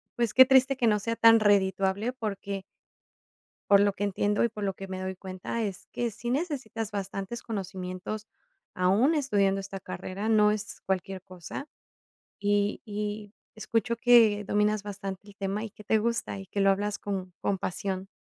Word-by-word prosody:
pues, 235 -3 0
qué 260 - +9
triste 265 0 +4
que 240 - +2
no 210 -1 +3
sea 230 +3 -2
tan 225 0 +7
redituable, 200 +2 +2
porque 200 -5 -4 1.1
por 200 - +8
lo 200 0 +3
que 200 - -7
entiendo 205 +1 +1
y 235 - +3
por 210 -2 -6
lo 195 -1 -1
que 195 +1 -8
me 185 0 -5
doy 190 0 -3
cuenta, 185 +4 -5
es 200 -4 -4
que 240 -1 -1
sí 240 +3 -5
necesitas 255 - -2
bastantes 195 +2 -4
conocimientos, 195 0 -5 0.5
aún 200 - +3
estudiando 200 -9 +2
esta 195 0 -6
carrera, 185 +3 -5
no 210 -2 +5
es 210 0 -4
cualquier 190 0 -2
cosa, 185 - -8 0.7
y 205 0 +1
y 210 0 -5 0.2
escucho 225 +1 -1
que 230 -3 +5
dominas 210 +1 +1
bastante 195 -1 -6
el 205 -1 -15
tema, 200 +2 -2
y 225 - -5
que 210 +1 -15
te 220 +1 +3
gusta, 230 -2 -1
y 195 0 -9
que 200 - -4
lo 195 0 +5
hablas 205 +1 -1
con 190 -2 -4
con 200 - 0
pasión. 190 +1 -3
205 Hz, 175 wpm, -28 LUFS, 195-220 Hz, 1.1 s, qué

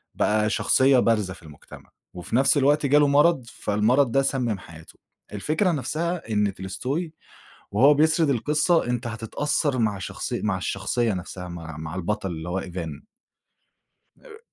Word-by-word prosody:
بقى 105 0 +1
شخصية 130 +3 +3
بارزة 105 -6 +1
في 85 - -16
المجتمع، 75 -2 -14 0.2
وفي 90 +5 -5
نَفْس 135 +4 +4
الوقت 145 +2 +3
جاله 145 +1 +4
مرض، 145 -1 +3
فالمرض 115 +4 +1
ده 135 - +3
سمم 125 -6 -1
حياته، 80 -2 -14 0.4
الفكرة 155 - 0
نَفْسها 160 -1 -3
إن 105 -2 +1
tolstoy 130 - -4 0.6
وهو 135 +9 +5
بيسرد 155 +1 +3
القصة 150 +6 +2
أنت 120 0 -2
هتتأثّر 130 +5 -1
مع 105 -4 0
شخصي 95 - -4
مع 105 -3 0
الشخصية 100 +5 -1
نَفْسها، 90 0 -6
مع 80 -3 -8
مع 80 +2 -7
البطل 95 +2 -2
اللي 80 +1 -6
هو 95 +2 -1
إيفان. 85 -5 -7 1.2
آآ 445 -3 -13
115 Hz, 145 wpm, -24 LUFS, 95-145 Hz, 1.2 s, وهو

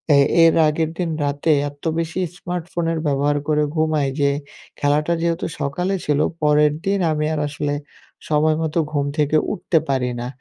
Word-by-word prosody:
এ - - +6 0.3
এর 165 - +5
আগের 155 +1 0
দিন 175 -2 -1 0.2
রাতে 145 +3 0 0.2
এত 145 0 -19 0.2
বেশি 165 +2 -3 0.2
স্মার্টফোনের 170 -2 -3
ব্যবহার 145 +1 +1
করে 150 -1 +2
ঘুমাই 155 -3 +1
যে 140 - +4 0.5
খেলাটা 150 +3 +1
যেহেতু 170 0 0 0.2
সকালে 180 +7 -1
ছিল, 150 -1 +1 0.2
পরের 150 0 +4
দিন 195 0 +1
আমি 150 0 0
আর 150 - -1
আসলে 145 0 -3 0.6
সময়মতো 155 +1 +1
ঘুম 145 -2 0
থেকে 150 0 +2 0.2
উঠতে 175 -3 0
পারি 125 -2 0
না 120 - -4
150 Hz, 155 wpm, -21 LUFS, 145-165 Hz, 0.6 s, এ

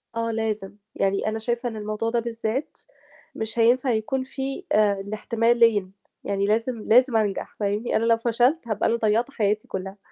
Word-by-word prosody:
آه 230 0 -1
لازم، 215 -3 -3 0.2
يعني 195 +1 0
أنا 220 +1 -1
شايفة 240 +2 -2
إن 225 - -8
الموضوع 215 +1 -3
ده 235 0 +1
بالذات 230 +3 -3 0.6
مش 225 +1 -4
هينفع 250 +3 +4
يكون 235 +4 -1
فيه 270 +1 -5
آآ، 205 -2 +3
الاحتمالين، 225 -1 +2 0.3
يعني 200 0 -1
لازم، 225 +2 0
لازم 250 +2 +5
أنجح، 205 -3 -2
فاهمني؟ 210 +3 -1
أنا 225 - +2
لو 230 0 +4
فشلت، 240 +5 +1
هابقى 215 -2 0
أنا - - +2
ضيّعت 230 +3 +1
حياتي 210 -3 0
كُلّها. 190 +1 -5
225 Hz, 165 wpm, -24 LUFS, 210-235 Hz, 0.6 s, لازم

